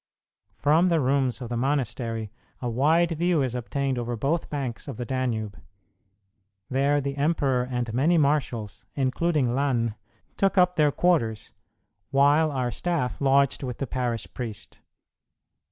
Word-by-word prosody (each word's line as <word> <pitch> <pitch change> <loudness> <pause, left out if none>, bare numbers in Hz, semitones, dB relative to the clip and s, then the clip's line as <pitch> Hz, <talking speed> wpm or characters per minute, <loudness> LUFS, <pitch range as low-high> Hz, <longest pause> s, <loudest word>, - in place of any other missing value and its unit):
From 155 - +3
the 170 -2 +3
rooms 130 -2 +1
of 120 - -5
the 120 - -2
monastery 120 -5 -2 0.3
a 125 - -3
wide 155 +8 +2
view 165 -2 +1
is 130 -2 -2
obtained 130 +2 -2
over 120 0 -3
both 145 +8 -1
banks 135 -5 -4
of 135 -6 -6
the 120 - -4
Danube. 115 -7 -2 1.1
There 140 +2 +2
the 140 0 -3
emperor 140 -4 +1
and 120 -3 -2
many 155 +8 +3
marshals, 130 - 0
including 135 -1 +1
Lannes, 125 -5 0 0.4
took 195 0 +1
up 180 0 +4
their 150 -2 +3
quarters, 135 -12 0 0.6
while 145 +5 +4
our 130 -3 -1
staff 155 -1 -2
lodged 140 0 +3
with 125 -3 -4
the 140 - -2
parish 120 -3 -2
priest. 115 -5 -7
135 Hz, 140 wpm, -26 LUFS, 120-150 Hz, 1.1 s, up